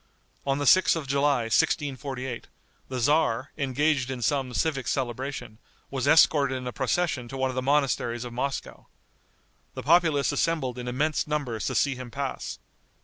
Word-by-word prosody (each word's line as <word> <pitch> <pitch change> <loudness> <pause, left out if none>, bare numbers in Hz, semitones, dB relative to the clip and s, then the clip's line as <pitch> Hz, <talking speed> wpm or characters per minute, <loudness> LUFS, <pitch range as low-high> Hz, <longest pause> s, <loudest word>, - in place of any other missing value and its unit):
On 135 0 +2
the 145 - -2
6th 185 +6 +6
of 160 -3 -4
July, 140 -1 +2
1648, 130 +1 -1 0.4
the 130 - -3
tzar, 130 -1 +1
engaged 140 -1 0
in 130 -2 -4
some 135 +2 0
civic 135 -1 -1
celebration, 125 -3 -3 0.3
was 135 -1 -2
escorted 145 -3 +5
in 125 - -7
a 125 - -3
procession 130 0 -1
to 135 - -7
one 130 0 0
of - - -8
the 130 - 0
monasteries 130 -4 0
of 120 - -7
Moscow. 135 +3 -4 0.9
The - - -5
populace 160 -3 +3
assembled 135 -7 -1
in 125 - -6
immense 145 +6 0
numbers 140 -7 -2
to - - -2
see 140 - +2
him 130 -1 -8
pass. 135 +2 -4
135 Hz, 160 wpm, -26 LUFS, 125-145 Hz, 0.9 s, 6th